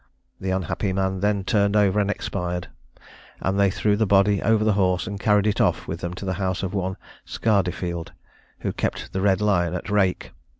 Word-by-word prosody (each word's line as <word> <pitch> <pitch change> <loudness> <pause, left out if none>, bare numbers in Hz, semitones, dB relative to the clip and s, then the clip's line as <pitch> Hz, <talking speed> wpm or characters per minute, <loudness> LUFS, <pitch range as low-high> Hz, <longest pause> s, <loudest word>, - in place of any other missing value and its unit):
The 95 - -3
unhappy 95 +1 -1
man 95 0 -1
then 100 0 +1
turned 100 -2 +2
over 105 -1 +3
and 100 -1 +1
expired; 90 -3 -3 0.7
and 95 +1 -1
they 100 -1 +4
threw 105 +2 +1
the 110 0 +1
body 100 +1 +4
over 110 0 +3
the 110 -1 +3
horse, 95 -2 +1
and 100 -2 -5
carried 105 -1 +3
it 105 - +1
off - - +1
with 80 - -4
them 85 0 -4
to 95 - -7
the 95 - -1
house 95 -1 -1
of 95 0 -3
one 95 -1 -2 0.3
Scardefield, 90 -5 -1 0.5
who - - -2
kept - - -3
the 95 - -1
Red 95 -1 +2
Lion 90 -5 +1
at 90 +3 -5
Rake. 95 -3 +1
95 Hz, 200 wpm, -24 LUFS, 95-105 Hz, 0.7 s, they